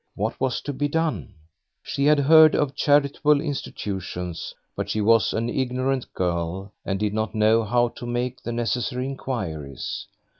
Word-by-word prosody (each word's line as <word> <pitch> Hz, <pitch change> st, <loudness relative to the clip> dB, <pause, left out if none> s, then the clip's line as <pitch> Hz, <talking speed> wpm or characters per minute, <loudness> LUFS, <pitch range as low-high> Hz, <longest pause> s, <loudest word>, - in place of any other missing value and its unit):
What -, -, -3 dB
was 130 Hz, -2 st, 0 dB
to 145 Hz, -, -4 dB
be 145 Hz, +2 st, 0 dB
done? 155 Hz, -, -2 dB, 0.5 s
She 140 Hz, -, -1 dB
had 150 Hz, +1 st, +5 dB
heard 155 Hz, +2 st, +7 dB
of 145 Hz, -2 st, +1 dB
charitable 145 Hz, +1 st, +3 dB
institutions, 95 Hz, -, -4 dB, 0.2 s
but -, -, -3 dB
she 110 Hz, -, -1 dB
was 115 Hz, +2 st, +4 dB
an 115 Hz, +1 st, -1 dB
ignorant 130 Hz, +1 st, -1 dB
girl 90 Hz, +2 st, -2 dB
and 95 Hz, -1 st, -2 dB
did 105 Hz, -1 st, 0 dB
not 110 Hz, 0 st, -2 dB
know 110 Hz, +1 st, +4 dB
how 120 Hz, +2 st, +2 dB
to 120 Hz, -, -9 dB
make 120 Hz, +1 st, -2 dB
the 120 Hz, -, -4 dB
necessary 125 Hz, +2 st, -1 dB
inquiries. 90 Hz, -, -5 dB
120 Hz, 155 wpm, -24 LUFS, 105-140 Hz, 0.5 s, heard